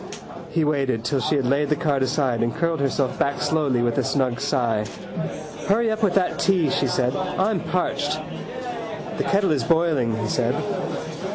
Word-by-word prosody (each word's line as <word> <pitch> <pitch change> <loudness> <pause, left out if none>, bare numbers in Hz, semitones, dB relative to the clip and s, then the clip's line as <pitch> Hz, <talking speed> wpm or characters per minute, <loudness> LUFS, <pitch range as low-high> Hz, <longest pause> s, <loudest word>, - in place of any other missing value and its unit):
He 165 -1 +1
waited 135 -6 0
till 140 +1 +1
she 150 - +1
had 135 -3 +1
laid 140 +3 +2
the 150 - +3
card 145 -3 0
aside 130 -2 +1
and 115 0 0
curled 165 -2 0
herself 135 -1 0
back 140 0 +1
slowly 145 -6 +1
with 120 -1 +1
a - - +1
snug 130 -3 0
sigh. 115 -6 +1 0.8
—Hurry 220 +3 +3
up 220 +1 -2
with 205 -4 +2
that 190 -2 +1
tea, 180 -7 +3
she 135 - +1
said. 125 +1 +1
I'm 190 +2 0
parched. 180 +2 -1 1.0
—The - - +2
kettle 195 -3 +2
is 145 - +1
boiling, 160 -9 +2
he 115 - -2
said. - - +1
145 Hz, 175 wpm, -23 LUFS, 130-170 Hz, 1.0 s, the